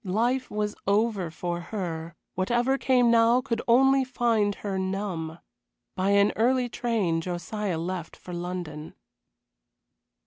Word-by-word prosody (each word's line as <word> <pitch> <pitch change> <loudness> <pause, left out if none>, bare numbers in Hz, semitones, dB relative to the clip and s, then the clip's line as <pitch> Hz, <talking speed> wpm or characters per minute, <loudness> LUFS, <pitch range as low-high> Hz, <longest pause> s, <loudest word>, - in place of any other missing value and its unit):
Life 240 +7 0
was 210 0 -2
over 205 -3 +1
for 175 +2 -4
her, 170 -3 -5 0.2
whatever 240 +8 +1
came 250 -3 +4
now 230 +1 +5
could 250 -3 -2
only 270 +3 +5
find 230 -5 +1
her 195 -2 -3
numb. 190 -4 -3 0.6
By 185 +1 0
an 200 0 +4
early 250 +2 +2
train 215 -10 0
Josiah 180 +2 -3
left 170 0 -4
for 180 - -10
London. 175 -3 -5
205 Hz, 125 wpm, -27 LUFS, 175-235 Hz, 0.6 s, now